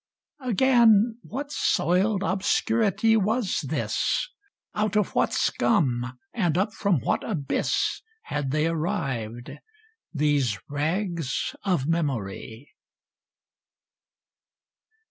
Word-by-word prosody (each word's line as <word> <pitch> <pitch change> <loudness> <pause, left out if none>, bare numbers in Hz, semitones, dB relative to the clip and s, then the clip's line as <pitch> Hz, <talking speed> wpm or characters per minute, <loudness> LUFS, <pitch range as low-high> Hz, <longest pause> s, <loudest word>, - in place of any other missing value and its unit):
— - - -55
Again, 230 -1 +4
what 285 +5 -6
soiled 190 - +1
obscurity 220 +3 +2
was 220 +1 +1
this: - - -1 0.4
Out 215 -1 -1
of 210 -1 +1
what - - +2
scum, 125 - +1 0.2
and 175 -8 0
up 205 +3 0
from 195 - +1
what - - 0
abyss. 150 -11 -1 0.2
Had 145 - -3
they 150 +3 +1
arrived 135 - -2 0.3
— 445 - -30
^these 140 -7 +2
rags 160 0 -2
of 180 -9 0
memoiy? 130 -7 -3
180 Hz, 95 wpm, -25 LUFS, 140-215 Hz, 0.4 s, Again